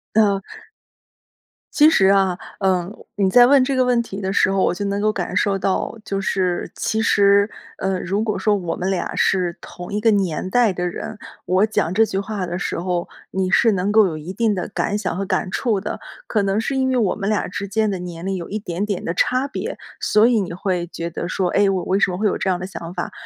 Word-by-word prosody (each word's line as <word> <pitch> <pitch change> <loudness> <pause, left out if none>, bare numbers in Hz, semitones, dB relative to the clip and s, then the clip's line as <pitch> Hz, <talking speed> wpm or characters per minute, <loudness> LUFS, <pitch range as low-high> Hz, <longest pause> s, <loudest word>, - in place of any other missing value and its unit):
呃。 200 -3 +3 1.3
其 305 +1 +7
实 190 -11 +4
啊， 195 -2 +3 0.2
嗯， 185 -2 +1 0.3
你 195 -2 +2
在 245 +3 +7
问 275 -1 +6
这 265 +1 0
个 255 - +3
问 245 -1 +2
题 200 -3 -7
的 190 0 -2
时 195 - +3
候， 195 -1 +1
我 - - +2
就 200 +3 -4
能 200 +1 -1
够 215 0 +2
感 180 -2 -4
受 195 -1 +1
到， 195 +4 -1
就 195 0 -2
是 185 -3 -1
其 220 0 -1
实， 200 -1 +4 0.3
呃， 190 -1 -1
如 200 +5 -1
果 215 -2 -1
说 210 -1 +2
我 175 -4 -3
们 185 +2 -2
俩 190 - -2
是 180 -2 +1
同 175 +1 -10
一 210 - 0
个 225 +1 +3
年 185 -2 0
代 235 -1 +3
的 180 0 -2
人， 210 +4 -6 0.2
我 185 +3 +3
讲 200 -5 -1
这 225 +2 +4
句 190 - -4
话 200 -1 -3
的 175 0 -4
时 180 - -3
候， 175 -1 -2 0.2
你 190 -1 -1
是 225 -3 +4
能 190 +2 0
够 215 -2 +5
有 155 -2 -4
一 160 +4 -7
定 220 0 +1
的 180 - -4
感 205 - -1
想 185 -4 -3
和 195 - -2
感 185 - -1
触 215 -5 0
的， - - -5 0.3
可 210 -3 +1
能 195 +2 +1
是 270 +3 -2
因 260 0 +1
为 260 - +1
我 220 -6 +2
们 200 -1 -4
俩 210 -3 +1
之 200 +2 -4
间 215 +1 0
的 190 - -3
年 175 0 -7
龄 195 -1 -1
有 170 - -6
一 210 - -2
点 195 -1 -3
点 200 -3 -3
的 165 - -2
差 255 +7 +1
别， 280 - -5 0.2
所 215 +2 +4
以 235 -3 +3
你 180 -3 -3
会 180 -1 -2
觉 170 0 -5
得 170 +1 -5
说： 185 -1 -1
“哎， 200 -1 +3
我 185 -2 0
为 195 +2 +1
什 195 - +3
么 180 - -3
会 215 - -1
有 205 - +2
这 190 - -1
样 180 - +1
的 185 - -6
想 175 -2 -7
法？” 175 - -4
195 Hz, 265 characters per minute, -21 LUFS, 180-215 Hz, 1.3 s, 其